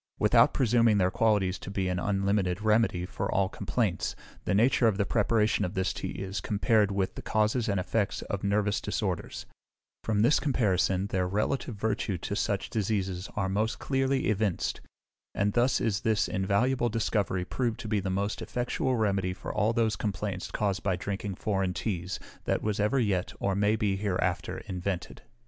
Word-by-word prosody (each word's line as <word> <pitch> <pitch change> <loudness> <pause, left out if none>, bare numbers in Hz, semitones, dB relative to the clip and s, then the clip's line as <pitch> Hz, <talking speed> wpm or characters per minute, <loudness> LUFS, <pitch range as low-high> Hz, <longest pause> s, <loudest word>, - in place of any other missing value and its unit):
Without - - +5
presuming 115 -3 +3
their 95 -1 +2
qualities 100 -4 +2
to - - -8
be 95 -1 -1
an 90 -1 -1
unlimited 95 -1 0
remedy 110 -5 +2
for - - -3
all 95 0 +2
complaints, - - -1 0.3
the - - +1
nature 120 +2 +4
of 105 -3 +2
the 100 - +1
preparation 110 -1 +2
of 90 - -3
this 95 0 0
tea - - -4
is 95 0 -4
compared 105 +1 +2
with 95 -1 -1
the - - -7
causes 110 +2 +1
and 100 -2 +1
effects 100 +3 -1
of 100 - -4
nervous 105 +1 +1
disorders: 95 -5 -3 0.6
from 105 -1 +1
this 135 +6 +4
comparison 95 - +1
their 95 -3 -1
relative 110 +5 -1
virtue 105 -2 -1
to - - -4
such - - -1
diseases 95 -3 -1
are 100 -2 0
most 105 +4 0
clearly 135 0 0
evinced: 105 -4 0 0.5
and 100 +1 +1
thus 125 +1 +3
is 110 -3 0
this 110 -2 +2
invaluable 120 +7 +1
discovery 105 -4 0
proved 120 +2 -2
to - - -6
be 105 -1 +1
the 95 0 -3
most 100 +3 -1
effectual 125 +1 -1
remedy 100 -5 0
for - - -6
all 105 +2 +2
those 115 -1 +1
complaints 100 -2 -3
caused 100 -2 -1
by 95 -3 0
drinking 100 +1 -4
foreign 95 -2 -1
teas, 90 -4 -3 0.3
that - - 0
was 105 -1 -1
ever 105 +6 +2
yet 100 -6 0
or 100 - 0
may 105 +2 +3
be 105 -3 0
hereafter 90 -3 -1
invented. 90 0 -4
100 Hz, 175 wpm, -29 LUFS, 95-110 Hz, 0.6 s, Without